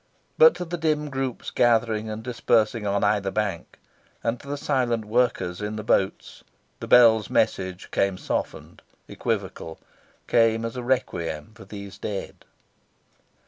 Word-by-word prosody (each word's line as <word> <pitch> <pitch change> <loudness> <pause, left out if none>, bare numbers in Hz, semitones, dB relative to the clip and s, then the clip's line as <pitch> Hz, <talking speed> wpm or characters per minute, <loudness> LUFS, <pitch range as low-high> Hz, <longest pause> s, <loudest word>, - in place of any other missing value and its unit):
But 480 0 +7
to 180 - -5
the 175 0 -5
dim 150 -2 0
groups 135 -2 -3
gathering 115 -2 +2
and 110 +1 -6
dispersing 115 -2 +1
on 100 0 0
either 100 -2 +1
bank, 100 -4 -3 0.5
and 115 +1 -1
to - - -14
the 145 +1 -3
silent 125 -6 0
workers 105 -6 0
in 105 +1 -3
the 105 - -5
boats, 95 -2 -1 0.4
the - - -7
bell's 110 -4 +6
message 95 -1 -1
came 100 -1 +1
softened, - - -4 0.3
equivocal; 80 -1 -4 0.5
came 115 -1 +3
as 115 - -5
a 125 - -4
requiem 105 - -2
for 100 - -14
these 100 -1 -9
dead. 100 -2 -6
110 Hz, 140 wpm, -25 LUFS, 100-125 Hz, 0.5 s, But